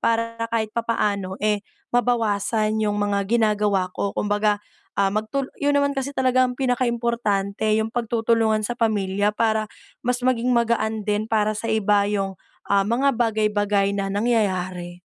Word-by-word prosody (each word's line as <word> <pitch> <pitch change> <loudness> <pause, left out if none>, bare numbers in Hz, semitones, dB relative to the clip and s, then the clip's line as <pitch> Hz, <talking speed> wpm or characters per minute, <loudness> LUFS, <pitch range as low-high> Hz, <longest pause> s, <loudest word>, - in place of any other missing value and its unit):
para 230 0 0
kahit 220 -2 -1
papaano, 205 -5 -1
eh, 210 -1 +2 0.3
mabawasan 220 -3 +1
yung 210 -1 0
mga 205 -1 0
ginagawa 210 -5 +1
ko. 200 +1 -3
Kumbaga, 210 0 +1 0.4
ah, 195 -1 +3
magtul 240 +6 -2
yun 285 0 +2
naman 280 0 +2
kasi 275 0 -3
talaga 255 0 +3
ang 250 -1 -3
pinakaimportante, 235 -6 0
yung 220 0 -1
pagtutulungan 230 -2 +1
sa 245 - -1
pamilya 205 -3 +1
para 220 0 0 0.3
mas 245 +1 -1
maging 250 -1 +1
magaan 220 -2 +1
din 210 +1 0
para 215 -1 +2
sa 215 +2 -5
iba 210 -2 +2
yung, 195 -2 -2 0.3
ah, 200 -1 +3
mga 260 +6 +2
bagay-bagay 210 -3 +1
na 195 0 -1
nangyayari. 185 -5 -1
215 Hz, 145 wpm, -23 LUFS, 205-235 Hz, 0.4 s, ah